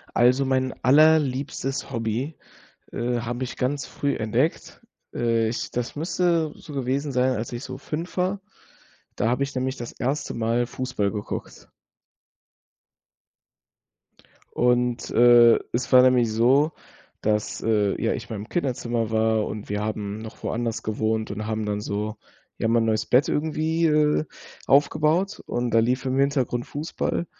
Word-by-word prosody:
Also 125 +3 +4
mein 130 -1 0
allerliebstes 140 -2 +3
Hobby, 120 +5 -2 0.6
äh, 120 0 -1
habe 120 +2 -3
ich 125 - -7
ganz 135 0 -1
früh 140 0 -2
entdeckt. 120 +9 -1 0.3
Äh, 115 -1 +1
ich 115 - -4
das 120 -1 -3
müsste 170 0 0
so 150 - -12
gewesen 135 +2 -2
sein, 130 0 +2
als 115 +3 -4
ich 120 +2 -5
so - - -7
5 165 +3 -5
war. 185 +2 0 0.7
Da 110 - 0
habe 125 +3 +1
ich 135 - -7
nämlich 130 +1 -2
das 120 - -7
erste 135 +4 -2
Mal 115 +1 0
Fußball 125 -6 -2
geguckt. 105 -2 -6 2.9
Und, 125 -1 +1
äh, 120 0 +6
es 125 +2 -2
war 125 -1 +8
nämlich 125 -3 +4
so, 135 +8 +3 0.5
dass, 105 -1 -1
äh, 105 -3 +1
ja - - +1
ich - - -6
in 110 - -4
meinem 105 +2 -7
Kinderzimmer 120 -7 -1
war 110 -1 +1
und 105 -1 -6
wir 105 0 -1
haben 105 -1 -3
noch 110 0 -10
woanders 115 -1 -2
gewohnt 110 0 -1
und 105 +1 -5
haben 110 -1 -2
dann 105 0 -2
so, 105 +1 -3 0.4
ja, - - +1
mein 115 0 +3
neues 110 0 0
Bett 125 +3 +4
irgendwie, 160 +2 0
äh, 150 0 +2 0.4
aufgebaut, 155 +7 +2
und 120 0 -2
da 115 - +4
lief 125 +3 0
im 130 +1 0
Hintergrund 135 -3 0
Fußball. 155 +3 -3
125 Hz, 150 wpm, -24 LUFS, 110-140 Hz, 2.9 s, war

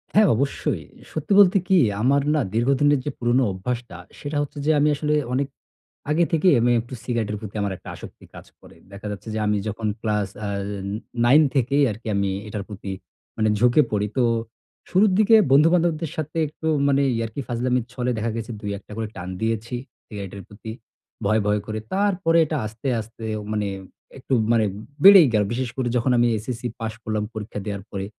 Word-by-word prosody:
হ্যাঁ, 210 -2 +6
অবশ্যই 135 +4 -1 0.3
সত্যি 155 +5 -5
বলতে 195 0 +7
কী? 190 - +4 0.2
আমার 140 +3 +3
না 150 - +2
দীর্ঘদিনের 140 +4 +3
যে 145 - -1
পুরোনো 120 +2 +2
অভ্যাসটা 120 +2 -5 0.2
সেটা 145 0 -4
হচ্ছে 145 0 -6
যে 155 - +4
আমি 150 +1 +4
আসলে 150 +1 -1 0.2
অনেক 135 +1 0 0.6
আগে 170 +3 +3
থেকেই 165 +2 +4
আমি 120 +1 +3
একটু 120 +3 -12
সিগারেটের 110 -4 -2
প্রতি 105 0 -8
আমার 100 -1 -1
একটা - - -11
আসক্তি - - -12
কাজ - - -11 0.2
করে। - - -16 0.2
দেখা 100 +1 -8
যাচ্ছে 105 +2 -8
যে 110 - -2
আমি 105 0 +2
যখন 110 +1 -3
ক্লাস 105 -3 0
অ্যা 105 -1 -3 0.8
নাইন 140 +6 +7
থেকেই 140 +3 +2
আরকি 110 +2 -9
আমি 100 -1 +1 0.2
এটার 105 -1 -5
প্রতি 100 -1 -6 0.5
মানে 110 0 +2
ঝুঁকে 125 +5 +5
পড়ি। 105 0 0
তো, 125 - +4 0.7
শুরুর 195 +2 +4
দিকে 220 +1 +6 0.2
বন্ধুবান্ধবদের 165 +1 +3
সাথে 155 +1 -4
একটু 155 +2 -6 0.2
মানে 140 0 +3 0.2
ইয়াকি 115 +4 -3
ফাজলামির 125 0 0
ছলে 125 0 -1
দেখা 110 +1 -1
গেছে 115 +1 -5
দুই 105 -2 -3
একটা 105 - -18
করে 110 -1 -2
টান 90 0 -6
দিয়েছি 115 +1 -2 0.3
সিগারেটের 100 -2 -7
প্রতি 110 +2 -9 0.5
ভয়, 105 +1 +3
ভয় 105 0 +2
করে 110 0 -4
তারপরে 190 -4 +2
এটা 155 0 -2
আস্তে, 110 +5 -6
আস্তে 115 +1 -12 0.3
মানে 105 -1 -1 0.5
একটু 135 0 -4 0.2
মানে 110 -2 +3 0.4
বেড়েই 195 -6 +10
গেলো। 105 -1 +3
বিশেষ 125 0 -2
করে 130 -2 -1
যখন 125 +2 +1
আমি 120 0 +4
এসএসসি 120 +2 -4
পাস 110 -1 -3
করলাম 110 -1 -1
পরীক্ষা 105 -1 -6
দেওয়ার 100 -2 -4
পরে 100 -1 -4
120 Hz, 180 wpm, -23 LUFS, 105-145 Hz, 0.8 s, বেড়েই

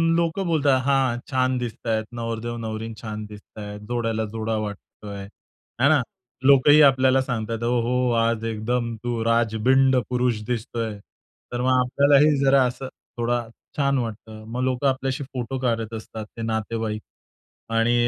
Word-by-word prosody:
लोकं 170 +3 0
बोलतात, 145 -5 +3
"हां, 135 -3 +2
छान 130 0 +2
दिसतायत, 115 -2 -2
नवरदेव 115 0 -3
नवरी 110 0 -4
छान 110 -1 -5
दिसतायत, 105 0 -9
जोड्याला 115 -2 -1
जोडा 110 0 -2
वाटतोय," 100 0 -8 0.6
हां 140 - +6
ना 150 -4 +5 0.5
लोकंही 145 +2 +7
आपल्याला 130 0 +3
सांगताहेत, 115 -2 -3
"ओहो! 120 +1 +1 0.3
आज 115 -1 0
एकदम 115 +2 -2
तू 120 -2 -1
राजबिंड 120 +3 +3
पुरुष 125 -3 0
दिसतोय." 115 -2 -3 0.5
तर 120 - -2
मग 130 +1 +2
आपल्यालाही 140 +3 +4
जरा 135 -1 +5
असं 125 +2 -4 0.3
थोडा 120 +1 +1 0.4
छान 140 -1 +2
वाटतं. 110 -2 -5
मग 125 - -2
लोकं 130 +2 +1
आपल्याशी 135 +1 -1
फोटो 130 0 -4
काढत 115 -3 -1
असतात 110 0 -7
ते - - -5
नातेवाईक 110 -1 -2 0.8
आणि 115 +1 +3
120 Hz, 135 wpm, -24 LUFS, 110-130 Hz, 0.8 s, लोकंही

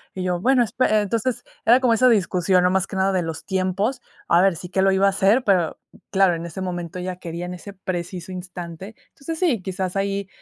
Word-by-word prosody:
Y 185 - -3
yo: 180 -1 -1
"Bueno 255 +1 +4
espe" 240 +3 0
eh, 215 0 +3
entonces, 230 +4 -2 0.2
era 245 +3 +6
como 245 -3 +3
esa 255 +3 +5
discusión, 185 -3 +2
no 180 - +3
más 190 0 +1
que - - -7
nada 190 +1 +2
de 185 - +1
los 165 -1 -5
tiempos, 190 +6 -1 0.3
a 170 +1 +5
ver 190 -3 +3
si 180 - -8
qué 190 +1 0
lo 195 0 +4
iba 190 +1 +3
a - - +5
hacer, 205 +6 +3
pero, 180 -5 +2 0.3
claro, 195 -2 +4
en 165 - -6
ese 180 +3 -7
momento 175 -1 -4
ella 180 0 -4
quería 170 -1 -6
en 180 - -5
ese 200 +3 -9
preciso 180 -1 -5
instante, 180 +2 -8
entonces, 320 +3 -7
sí, 285 - +1
quizás 185 0 -4
ahí 195 0 -1
190 Hz, 230 wpm, -22 LUFS, 180-205 Hz, 0.3 s, era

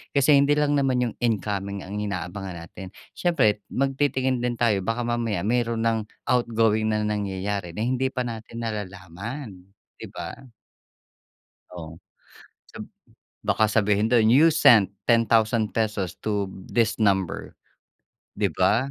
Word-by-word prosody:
Kasi 140 +1 +5
hindi 145 +1 +3
lang 145 -1 +2
naman 130 -2 +1
yung - - -12
incoming 100 -4 -1
ang 100 +2 -5
inaabangan 95 -1 -5
natin 95 +3 -10 0.3
siyempre 120 - +1
magtitingin 135 -1 0
din 120 -1 -1
tayo 110 -5 +2
baka 115 +3 -1
mamaya 115 -4 -1
meron 115 -1 0
nang 115 -1 +2 0.3
outgoing 115 -3 +2
na 105 0 0
nangyayari 100 -3 -3
na 110 - -1
hindi 130 +1 0
pa 125 -1 -3
natin 115 -1 -7
nalalaman, 100 - -7 0.3
'di - - -7
ba? - - -6 1.4
Oh, 80 -2 -9 0.7
sab - - -8 0.6
baka 110 - +3
sabihin 105 0 +2
dun 115 -3 +4
you 155 +5 +6
sent 105 - +5 0.2
₱10,000 110 -4 +1
to 100 -2 -1 0.2
this 115 -3 +1
number, 95 -5 0 0.8
'di - - 0
ba? 130 +6 +2
110 Hz, 125 wpm, -24 LUFS, 100-120 Hz, 1.4 s, you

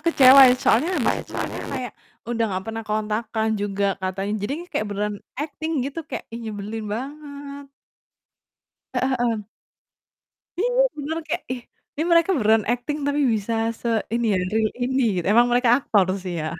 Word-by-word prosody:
kecewa 275 -5 +7
ya 250 - +5
soalnya 255 +5 +3
habis - - 0
itu - - -12
mereka - - -4
kayak - - -5 0.3
udah 230 -1 -1
nggak 190 0 -3
pernah 225 0 -5
kontakkan 215 +1 -1
juga 200 0 -1 0.2
katanya, 195 +2 -2
jadi 225 - -2 0.2
kayak 215 - -1
beneran 205 +1 -2 0.2
akting 310 +2 -4
gitu 280 +4 -4
kayak, - - -5
ih, 235 - -6
nyebelin 215 0 -5
banget. 280 +4 -7 1.3
Heeh 260 +1 +1
heeh. 230 -3 0 1.2
Iya, 485 +3 +2 0.3
beneran 315 +3 -3
kayak, 340 +3 -2
ih, 245 -2 -5 0.3
ini 300 - -2
mereka 335 +2 +5
beneran 220 -3 +3
akting 250 +5 -3
tapi 285 +1 +1
bisa 210 +2 -2 0.3
se 235 - -2 0.3
ini 235 0 0
ya - - +2
real 220 -1 +2
ini, 260 +1 +1 0.3
emang 235 +3 +6
mereka 245 0 +3
aktor 205 -9 +2 0.2
sih 180 - -3
ya. 155 - -3
235 Hz, 160 wpm, -23 LUFS, 210-280 Hz, 1.3 s, kecewa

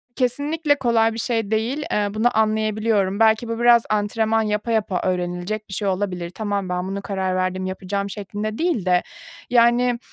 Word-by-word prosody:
Kesinlikle 290 +4 +1
kolay 235 -4 +2
bir 225 - -5
şey 225 -3 -1
değil, 235 +7 0
eee, 210 -1 +1
bunu 220 +1 +1
anlayabiliyorum. 215 -2 +1
Belki 220 +1 +3
bu 230 0 -3
biraz 240 -1 +6
antrenman 220 +1 +1
yapa 210 +1 -1
yapa 205 -5 0
öğrenilecek 180 +4 -2
bir - - -7
şey 200 +1 -2
olabilir. 185 -3 -2
"Tamam, 200 0 -3
ben 180 +1 -2
buna 195 +1 -4
karar 190 -2 -2
verdim, 185 0 -1
yapacağım." 195 +1 -3
şeklinde 210 +2 -5
değil 325 - 0
de, 180 -1 +3 0.5
yani, 240 0 +3
215 Hz, 165 wpm, -22 LUFS, 195-230 Hz, 0.5 s, biraz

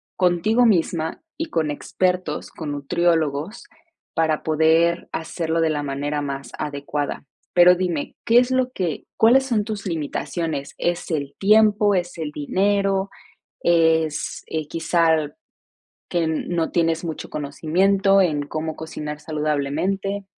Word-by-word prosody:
contigo 190 +7 +3
misma 165 -4 0 0.2
y 325 - -2
con 155 -2 0
expertos, 180 +1 -2
con 150 -3 -5
nutriólogos, 160 +4 0 0.5
para 160 -2 +1
poder 160 +2 +2
hacerlo 165 0 -2
de 160 - +2
la 145 -1 -1
manera 145 +1 -2
más 140 -1 -5
adecuada. 145 -1 -3 0.3
Pero 180 0 +7
dime, 175 -5 -2
¿qué 235 +1 +4
es 250 +1 +1
lo 255 -1 +1
que 175 - -3
cuáles 255 +4 +5
son 225 -5 +1
tus 210 -2 -5
limitaciones? 160 -2 -3
¿Es 175 +1 -2
el 140 -3 -2
tiempo, 210 0 +4
es 175 -1 -2
el 150 -2 -3
dinero, 195 +5 0 0.5
es, 160 -2 +2
eh, 155 -2 -3
quizá 165 -2 +1 0.8
que 170 -2 0
no 160 +1 -1
tienes 165 0 +1
mucho 160 -2 -5
conocimiento 190 +7 +2
en 155 -6 +1
cómo 155 +1 -4
cocinar 150 -2 -6
saludablemente? 155 +7 -2
165 Hz, 125 wpm, -22 LUFS, 150-190 Hz, 0.8 s, Pero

